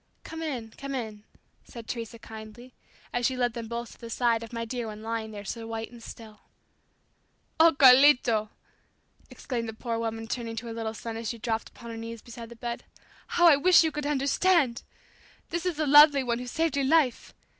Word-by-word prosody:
"Come 325 0 -8
in, 250 -8 -4
come 275 0 -5
in," 215 -4 -6 0.4
said 230 -2 -11
Teresa 230 -1 -5
kindly, 220 +3 -11 0.4
as 245 - -1
she 260 - -3
led 245 -2 0
them 230 -1 -6
both 235 +1 -5
to - - -16
the 230 - -9
side 230 -1 +1
of 230 - -9
my 230 -1 -4
dear 240 0 -4
one 215 0 -8
lying 225 -1 -3
there 205 -1 -9
so 225 +3 -5
white 225 0 -5
and 240 -1 -13
still. 220 -2 -11 1.2
"Oh, 325 -1 +6
Carlito," 250 -5 +6 0.8
exclaimed 235 -4 -4
the - - -6
poor 230 +1 -4
woman 225 0 -4
turning 230 0 -4
to 225 +2 -6
her 230 - -6
little 225 -1 -4
son 225 0 -6
as 225 -1 -4
she 235 - -4
dropped 225 -1 -3
upon 235 0 -11
her 225 - -7
knees 230 0 -7
beside 235 -1 -10
the 235 - -11
bed. 235 +1 -5 0.4
"How 350 - +2
I 300 -4 +7
wish 350 +4 +6
you 320 - 0
could 295 -1 -4
understand! 285 -1 +2 0.7
This 340 +2 -2
is 345 -4 -2
that 310 -1 0
lovely 290 -1 +7
one 235 -1 -1
who 250 - -7
saved 320 +3 -1
your 280 -1 +1
life! 295 -5 +1
235 Hz, 205 wpm, -27 LUFS, 225-275 Hz, 1.2 s, I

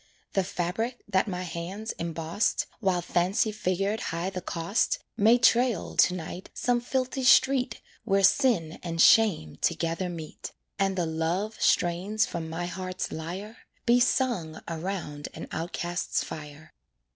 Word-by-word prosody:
The 195 - +2
fabric 200 +7 -3
that 190 -1 +2
my 180 -2 -3
hands 180 +6 -5
embossed, 165 +4 -1
While 185 -5 +1
Fancy 190 +6 +1
figured 200 0 -1
high 170 +3 -2
the 185 -1 -5
cost, 170 +4 0 0.2
May 225 +4 +5
trail, 240 -4 +3
to 180 - +5
night, 180 +1 -7
some 245 -1 +1
filthy 260 +1 -2
street 255 -2 +4 0.2
Where 195 -3 +2
sin 195 - +3
and 165 -1 -4
shame 175 - +5
together 165 +2 -1
meet, 160 -3 -7 0.3
And 195 -1 +1
the 175 - +1
loved 165 +7 -2
strains 185 +5 +2
from 165 -1 -5
my 170 +2 -3
heart's 185 +1 -4
lyre 185 +8 -6 0.3
Be 245 0 +5
sung 240 -11 0
around 165 -3 -4
an - - -7
outcast's 175 +1 -2
fire. 155 0 -9
185 Hz, 135 wpm, -27 LUFS, 165-215 Hz, 0.3 s, May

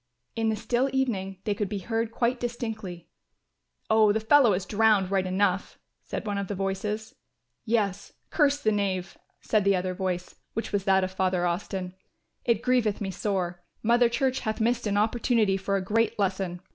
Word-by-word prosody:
In 225 -1 +1
the 220 - +1
still 245 +5 0
evening 205 -8 -1
they 210 - 0
could 200 -1 -2
be 205 - -3
heard 225 +3 -2
quite 240 +2 0
distinctly. 220 -8 -5 0.8
"Oh, 220 -1 +5
the 220 - +1
fellow 235 0 +5
is 185 +1 -2
drowned 210 -3 +3
right 190 -1 +1
enough," 190 0 0 0.3
said - - -5
one 205 -1 -1
of 200 - -3
the 205 - -3
voices. 195 +3 -3 0.5
"Yes, 205 -4 -1 0.2
curse 290 -2 +3
the 215 -6 +2
knave," 195 -3 -1 0.3
said 215 -2 +1
the 200 0 +4
other 185 0 -1
voice, 180 -1 -3 0.2
which 225 - -3
was 200 -2 -1
that 190 -1 +4
of 185 - -2
Father 185 -1 0
Austin. 180 +1 -3 0.5
"It 230 -3 +1
grieveth 245 -5 +2
me 195 -2 -3
sore. 180 -3 -2 0.2
Mother 235 +1 +4
Church 260 +2 0
hath 215 0 -3
missed 235 0 +1
an 205 0 0
opportunity 220 -1 +2
for 195 +1 -1
a 195 - 0
great 225 +2 +1
lesson. 190 -3 -1
205 Hz, 180 wpm, -27 LUFS, 190-225 Hz, 0.8 s, Oh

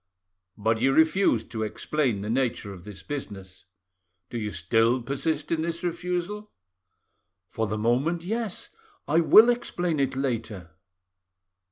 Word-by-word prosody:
"But 110 +1 0
you 135 +2 +3
refused 160 - +3
to 110 - -4
explain 115 0 -1
the 105 - -4
nature 120 -5 -1
of 90 -2 -13
this 105 -2 -10
business. 100 -10 -7 0.7
Do 120 - -3
you 105 -1 -3
still 115 +8 +1
persist 145 +4 -2
in 165 -1 +1
this 170 +1 -3
refusal?" 180 +4 -3 1.0
"For 110 -1 -1
the 110 +1 -2
moment, 130 +10 +1
yes. 220 +1 -3 0.4
I 160 +3 +3
will 215 +8 +7
explain 175 -9 -2
it 135 -1 0
later." 110 -10 -3
135 Hz, 135 wpm, -26 LUFS, 110-170 Hz, 1.0 s, will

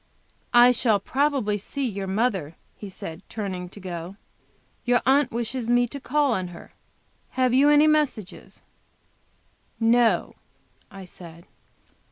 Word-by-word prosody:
"I 240 +1 +8
shall 230 -4 +2
probably 260 -3 0
see 270 +6 -3
your 200 -3 -5
mother," 190 -6 -1 0.2
he 205 - -9
said, 170 -2 -8
turning 185 -4 -5
to 205 - -13
go; 180 -1 -7 0.7
"your 245 0 +3
aunt 280 +2 +3
wishes 235 +1 -3
me 245 0 +3
to 280 - -7
call 280 +2 +1
on 185 -4 -2
her; 175 -1 -13 0.6
have 255 -1 +2
you 275 +3 +5
any 295 +1 +6
message?" 295 -10 +1 1.5
"No," 230 0 +2 0.6
I 195 -1 -11
said. 170 -1 -12
230 Hz, 130 wpm, -24 LUFS, 190-255 Hz, 1.5 s, I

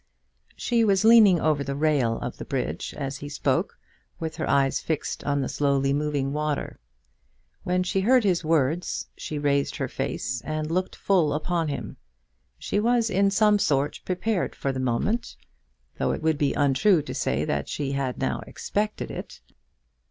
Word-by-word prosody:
She 235 -1 +1
was 200 -1 +3
leaning 220 -6 +7
over 150 -3 +1
the 140 0 -3
rail 140 -6 +1
of - - -5
the - - -6
bridge - - -3
as 135 0 -4
he 145 +1 -7
spoke, 145 - -1 0.4
with 160 -1 -4
her - - -2
eyes 135 -1 +2
fixed 160 -2 -3
on 145 -1 +1
the - - -1
slowly 140 -1 +1
moving 145 -2 -1
water. 150 -1 -2 0.8
When 180 0 0
she 190 +1 0
heard 250 +4 +4
his 180 -4 +1
words, 160 +1 0
she 155 - -5
raised 140 -1 +1
her 135 - -2
face 130 -2 -3
and 155 0 -3
looked 185 +2 -1
full 175 -7 +2
upon 165 +2 -1
him. 125 -7 -5 0.6
She 205 - -1
was 235 +1 +2
in 195 +1 +3
some 210 +1 +4
sort 145 -4 +1
prepared 185 +2 -1
for 135 - -2
the 130 - -4
moment, 130 - -1 0.6
though - - +1
it - - -5
would 160 -2 +1
be 145 -2 +1
untrue 145 +5 +3
to - - -6
say 70 +4 -1
that 70 -1 -2
she 140 -2 -2
had 135 -2 -2
now - - -1
expected 210 +1 -3
it. - - -8
150 Hz, 170 wpm, -25 LUFS, 140-185 Hz, 0.8 s, leaning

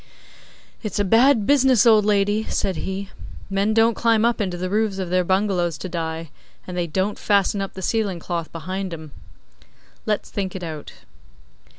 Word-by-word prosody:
'It's 215 -4 -4
a 205 - +2
bad 230 +2 +4
business, 265 -3 +4
old 215 -3 +6
lady,' 205 +1 +2
said 190 - -1
he. 190 +1 -4 0.4
'Men 200 +2 +1
don't 225 +1 +4
climb 225 0 +2
up 235 -1 +1
into 185 -3 -2
the 185 +1 -3
roofs 210 0 0
of 185 -2 -4
their 185 0 +3
bungalows 185 -3 0
to 185 - -6
die, 165 -2 -4 0.3
and 180 - -7
they 175 -1 -1
don't 190 +5 -1
fasten 200 0 +2
up 195 - -4
the 190 - -7
ceiling 205 -3 0
cloth 170 -1 -4
behind 185 +2 -4
'em. 155 -2 -11 1.0
Let's 210 -1 -1
think 195 -2 -3
it 185 - -5
out. 155 -3 -6
195 Hz, 175 wpm, -22 LUFS, 180-215 Hz, 1.0 s, old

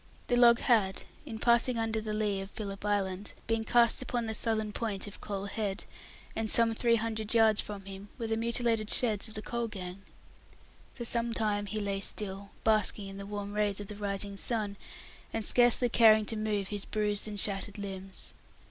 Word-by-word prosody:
The 245 - +3
log 240 -1 +7
had, 205 -6 +2 0.2
in 225 -4 -5
passing 235 +1 +3
under 225 -1 -1
the 215 0 -4
lee 210 -2 0
of 195 - -7
Philip's 200 -2 -6
Island, 200 -1 -1
been 225 -1 0
cast 235 +2 +3
upon 245 -2 -2
the 220 - -3
southern 220 -1 -1
point 205 -3 -3
of 205 - -10
Coal 200 -1 -4
Head; 200 -1 -3 0.6
some 230 +1 +5
three 235 +1 +3
hundred 220 0 -1
yards 220 -2 +5
from 200 -2 -7
him 195 +1 -9
were 235 - -4
the 225 0 0
mutilated 230 -1 0
sheds 220 -4 +1
of 220 - -8
the 215 - -5
coal 235 -1 -2
gang. 185 -3 -7 0.9
For 240 - -5
some 235 0 0
time 205 -2 0
he 215 +2 -3
lay 200 -1 -1
still, 200 -1 -2
basking 215 -2 +2
in 195 - -9
the 200 0 -7
warm 205 0 -5
rays 210 -1 +1
of 205 - -7
the 210 - -4
rising 200 -1 -3
sun, 210 -2 -1 0.6
and 225 -2 -1
scarcely 245 0 +4
caring 220 -2 +6
to 225 - -2
move 210 -2 -1
his 205 -1 -3
bruised 210 -1 -1
and 205 -1 -5
shattered 195 0 -1
limbs. 195 -1 -7
215 Hz, 190 wpm, -30 LUFS, 200-225 Hz, 0.9 s, log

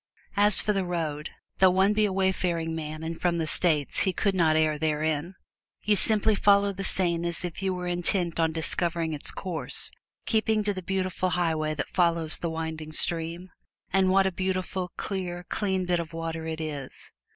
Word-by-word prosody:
As 205 0 +7
for 210 - 0
the 195 -1 0
road, 160 -4 -3 0.3
though 190 - +7
one 190 +3 +3
be 215 0 +2
a 205 - -1
wayfaring 180 -4 0
man 155 0 -5
and 165 0 -5
from 175 -1 +1
the 165 - -1
States 155 -3 +1
he 190 - +2
could 200 +1 0
not 165 -4 +3
err 155 -1 +1
therein. 155 +2 -1 0.5
You 210 0 +3
simply 220 +1 +4
follow 200 0 +3
the 195 +1 -5
Seine 170 -3 +2
as 170 +1 -1
if 175 +1 -6
you 190 -1 0
were 180 -1 -4
intent 175 -1 0
on 165 -1 +2
discovering 165 0 -1
its 145 - 0
source, 180 -4 -2 0.3
keeping 220 -1 +1
to 205 0 0
the 185 - -6
beautiful 185 0 -1
highway 160 -4 0
that 140 - -5
follows 170 -3 +1
the 170 - -2
winding 160 -1 -5
stream. 170 +2 0 0.4
And 190 -1 +3
what 195 +1 +4
a 190 - +1
beautiful, 185 0 -3
clear, 180 -3 -4
clean 190 -3 -1
bit 175 -1 +1
of 165 -1 -6
water 165 0 -4
it 160 0 -4
is! 145 -4 -7
175 Hz, 185 wpm, -26 LUFS, 160-190 Hz, 0.5 s, As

